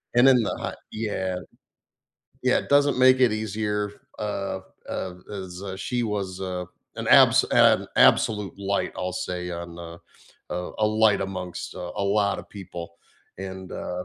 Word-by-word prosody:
and 120 +2 +7
in 130 - +6
the - - -2
hot - - -3 0.2
Yeah. 95 -4 -2 1.1
Yeah, - - +3
doesn't 145 -1 +4
make 130 0 +6
it 125 -4 +5
easier 105 -1 -2 0.3
f - - -4
uh, 100 -2 -3
p - - -23 0.3
uh, 95 - -3 0.3
as, 95 -1 -7
uh, 95 -1 -5
she 125 - -1
was, 100 -4 -3
uh, 90 -1 -3 0.3
an - - -4
abs - - +7
an - - +5
absolute 105 -5 +4
light, 100 0 -1
I'll 90 0 -2 0.2
say, 90 0 -3
on 85 0 -5
a 85 -1 -7 0.6
uh, 90 0 -3
a 110 - +3
light 110 -1 +3
amongst, 90 -2 -5
uh, 90 0 -6
a 100 - 0
lot 100 0 +2
of - - -9
people, 85 -3 -7 0.5
and, 95 -1 -7
uh 90 0 -4
95 Hz, 165 wpm, -25 LUFS, 90-105 Hz, 1.1 s, and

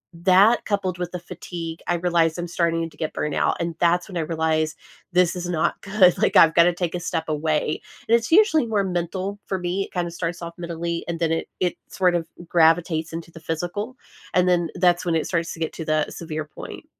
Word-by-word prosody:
that 190 +6 +5
coupled 190 -4 -1
with 175 -1 -3
the 180 - -4
fatigue, 170 -1 -7
I 175 - +2
realized 170 -1 +1
I'm 175 - -3
starting 165 -1 0
to - - -17
get 155 - -3
burned 150 - -2
out, - - +1
and 170 0 -2
that's 175 +1 +2
when 190 - -9
I - - +1
realized 160 0 0 0.4
this 180 -1 +3
is 180 0 -4
not 160 -3 0
good, 195 -3 +4
like, - - +2
I've 165 -1 +7
gotta 170 +1 +6
take 175 -1 -2
a - - -2
step 165 -2 -2
away, 155 0 0 0.3
and 230 - +5
it's 235 +5 -1
usually 325 - +5
more 210 -3 +1
mental 185 +2 -3
for 190 - -1
me. 180 +2 -2
It - - -17
kinda 175 -2 -2
starts 170 0 -4
off 170 - -6
mentally, 170 0 -3
and 170 -1 -2
then 165 -1 +1
it 165 - -2
it 180 -2 0
sort 180 -2 +2
of 165 -2 -1 0.2
gravitates 165 -1 +3
into 165 0 -6
the 165 - -11
physical, 175 +9 -4 0.4
and 180 0 +4
then 175 -2 +2
that's 175 -1 +3
when 170 -2 +1
it 160 - 0
starts 165 -1 -1
to - - -11
get 160 - -2
to 160 - -6
the 155 -1 +1
severe 155 -2 -5
point. 150 - -10
170 Hz, 220 wpm, -23 LUFS, 165-180 Hz, 0.4 s, I've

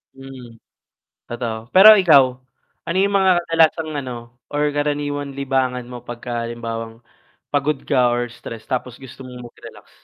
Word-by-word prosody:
Mm, 130 -3 -12 0.7
totoo. 120 -2 -4 0.2
Pero 200 +3 +10
ikaw, 150 -8 +6 0.6
ano 170 +2 -1
yung 200 0 0
mga 190 -1 +4
kadalasang 160 -1 +2
ano, 130 -2 -6 0.4
or 145 - 0
karaniwang 145 -1 -3
libangan 130 -2 -1
mo 125 -1 -8
pagkahalimbawang 115 -1 -6 0.5
pagod 145 0 0
ka 125 -3 +2
or 120 0 -2
stress 115 -1 -10
tapos 125 -1 -3
gusto 130 0 -11
mong 125 -1 -10
mag-relax? - - -15
130 Hz, 130 wpm, -20 LUFS, 120-145 Hz, 0.7 s, Pero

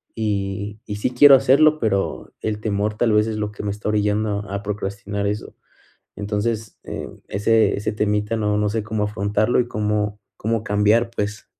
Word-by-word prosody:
y 105 -1 -2
y 105 -1 -5
sí 105 - -1
quiero 140 +3 +8
hacerlo, 150 +4 +4
pero 100 -5 -1
el 105 -1 -2
temor 105 0 -1
tal 115 -1 +2
vez 105 +1 +3
es 110 -1 -3
lo 105 0 -2
que 105 - -8
me 100 - -1
está 105 +1 -6
orillando 105 0 +1
a 100 0 -3
procrastinar 100 0 -3
eso. 105 +1 -4 0.6
Entonces, 105 +2 -2
eh, - - -6 0.2
ese 105 +1 +2
ese 105 - -2
temita 105 +1 0
no, 105 -1 0
no 105 0 +1
sé 110 0 -2
cómo 105 -1 -2
afrontarlo 105 +3 +1
y 120 - -4
cómo 105 -1 -1 0.2
cómo 110 0 -1
cambiar, 105 +3 +2
pues. 105 -1 -3
105 Hz, 175 wpm, -22 LUFS, 105-110 Hz, 0.6 s, quiero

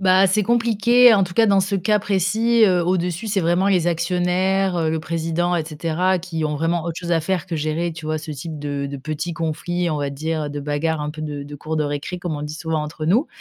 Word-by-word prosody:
Bah, 190 0 +5
c'est 210 +2 +2
compliqué 235 +1 +5
en 195 -3 +4
tout 175 -1 -9
cas 225 -1 +4
dans 200 -1 +4
ce 195 +1 0
cas 210 +3 +2
précis, 215 +4 +2
heu, 180 -4 +3
au-dessus 180 +2 -1
c'est 200 -2 0
vraiment 175 +3 +2
les 180 -4 +3
actionnaires, 180 +2 +1
heu, 160 -2 +1
le 160 - -1
président 165 +2 -1
et 160 - -1
cetera 165 +4 0
qui 165 -3 -4
ont 150 -1 -1
vraiment 165 +2 -1
autre 170 - -3
chose 175 -1 -5
à 165 - +3
faire 185 +2 -2
que 170 -3 -3
gérer, 155 +3 -1
tu 160 -1 -8
vois, 155 0 -1
ce 155 0 -8
type 150 +1 -6
de 140 -1 -3
de 140 0 -6
petits 155 +5 -4
conflits, 170 +2 -2
on 155 - -1
va 140 -1 -2
dire, 155 +2 -3
heu, 145 - -4
de 145 0 -5
bagarre 150 +2 -1
un 150 0 -3
peu 155 - -9
de 150 -2 -4
de 145 +1 -9
cours 155 +3 -4
de 155 - +1
récré 145 +5 -3
comme 170 -4 -3
on 145 - -5
dit 150 +1 -5
souvent 160 -1 -2
entre 155 +1 -5
nous. 230 - +3
170 Hz, 255 wpm, -21 LUFS, 155-185 Hz, -, Bah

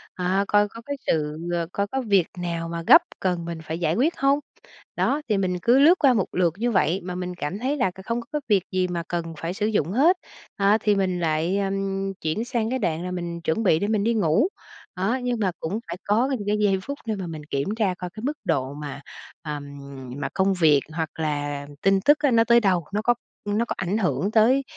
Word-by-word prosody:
Ờ, 185 +2 +1
coi 205 0 +4
có 230 +3 -11
cái 285 - -3
sự 150 -1 0 0.2
ơ, 170 -1 -1
coi 200 0 0
có 265 +5 -2
việc 200 -7 +3
nào 170 -1 -3
mà 170 0 -4
gấp - - +9 0.2
cần 180 -3 -1
mình 170 -1 -5
phải 160 +1 -4
giải 165 -1 +1
quyết 295 +9 +1
hông? 275 +1 +3 0.6
Đó, 290 +2 +1
thì 210 - +2
mình 185 -2 0
cứ 240 +8 +4
lướt 320 +6 +7
qua 275 -4 +5
một 205 -6 +1
lượt 175 -3 +1
như 240 +3 0
vậy 190 -3 +2
mà 180 0 -5
mình 180 0 -4
cảm 175 +4 -4
thấy 270 +5 -1
là 245 -9 +1
c - - -32
không 235 +1 -1
có 230 - -14
cái 300 - -1
việc 200 -5 +3
gì 185 -1 +1
mà 175 -1 -3
cần 170 -1 -3
phải 165 +3 -3
sử 205 +2 -1
dụng 205 -7 0
hết, 310 - +4 0.4
đó, 200 +2 +4
thì 210 -1 +3
mình 185 -2 0
lại, 165 +3 0
ừm, 195 0 -2
chuyển 160 +9 -1
sang 235 -3 -1
cái 260 +1 -1
đoạn 170 -6 -1
là 180 - -4
mình 170 -1 -4
chuẩn 165 +7 0
bị 160 -6 +4
để 205 - -1
mình 215 -2 +1
đi 230 +2 +2
ngủ. 210 - +3 0.5
Đó, 200 +8 0
nhưng 245 -2 -1
mà 195 -4 +1
cũng 190 +7 -3
phải 170 - -5
có 220 +5 +2
những 205 - -6
cái 210 +1 +2
giây 200 -2 +2
phút 280 +5 -5
để 220 -2 -1
mà 190 -3 -5
mình 155 -2 -7
kiểm 140 0 -1
tra 210 -5 +1
coi 180 -1 -5
cái 215 +4 -10
mức 295 +4 -2
độ 140 -4 0
mà, 145 -1 -7 0.4
à, 150 -3 -4 0.6
mà 140 -1 -3
công 195 0 +2
việc, 160 -6 +4
hoặc 160 -1 -2
là 145 -2 -2
tin 195 0 +3
tức 295 +8 +5
á 290 -3 +2
nó 225 -1 +5
tới 235 +1 +5
đâu, 185 -7 +1
nó 210 - 0
có 240 +2 +3 0.3
nó 210 +3 0
có - - -2
ảnh 190 +3 -1
hưởng 200 0 0
tới, 235 +5 +4
195 Hz, 245 wpm, -24 LUFS, 170-225 Hz, 0.6 s, gấp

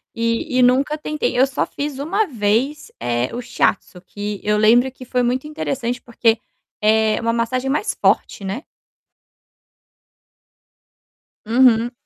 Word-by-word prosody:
e 230 +5 -1
e - - +5
nunca 265 +5 +3
tentei. 300 -5 -2
Eu 260 - +6
só 265 - -1
fiz 285 -1 -5
uma 385 +9 0
vez, 235 +5 -1
eh, 120 +1 -1
o 245 - -3
Shiatsu 225 -6 -1
que 205 +2 -6
eu 210 0 +1
lembro 240 +5 +4
que 255 0 -12
foi 250 0 0
muito 250 +4 0
interessante 260 -5 -3
porque, 230 -1 +1 0.4
eh, 220 0 +3
uma 230 0 0
massagem 250 +3 -1
mais 300 +10 0
forte, - - +1
né. 205 +10 -4 2.8
Uhum. 235 0 +4
245 Hz, 135 wpm, -20 LUFS, 220-265 Hz, 2.8 s, Eu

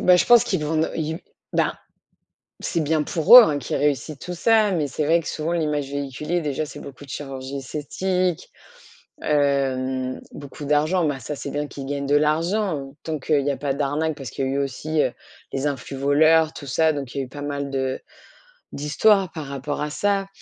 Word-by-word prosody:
bah, 180 0 +6
je - - +3
pense 240 -1 +7
qu'ils 150 - -1
vont 160 +1 +1
ils 160 0 -2 0.3
ben, - - +2 0.9
c'est 170 - -1
bien 155 0 +1
pour 165 - +7
eux, 245 - +12
hein, 150 -7 0
qu'ils 130 - -4
réussissent, 145 0 0
tout 180 - -6
ça, 215 +3 +3
mais 160 -6 0
c'est 150 +3 -2
vrai 165 +3 +4
que - - -9
souvent, 155 +2 -3
l'image 150 -4 -1
véhiculée 140 +5 -2
déjà, 150 0 -2
c'est - - -10
beaucoup 140 0 -10
de - - -19
chirurgie 135 -1 -6
esthétique, 175 +6 -2 0.7
hem, 130 -3 0
beaucoup 145 +1 -9
d'argent. 155 +5 +2
Ben, 145 -3 -1
ça, 130 +5 -5
c'est 140 - -6
bien 145 0 -2
qu'ils 140 -1 -8
gagnent 140 0 -3
de 145 +1 +2
l'argent, 155 -1 0
tant 160 -1 -2
qu'il 145 +1 +1
y 145 - +2
a - - -2
pas 140 -2 -1
d'arnaque, 145 +3 -1
parce 135 -4 -7
qu'il 135 - -3
y 130 - -1
a - - -1
eu 135 - -1
aussi, 140 +3 -1
heu, 125 - -1 0.4
les 135 +2 0
influvoleurs, 145 +4 +2
tout 140 - -9
ça, 160 +5 +3
donc 140 -3 -6
il - - -1
y - - 0
a - - -2
eu - - -15
pas 145 +2 -9
mal 140 -1 -3
de 130 -1 -2 0.7
d'histoires 185 +6 +2
par 155 -4 -6
rapport 140 +2 -4
à 150 - -2
ça. 200 +4 0
145 Hz, 205 wpm, -23 LUFS, 140-160 Hz, 0.9 s, eux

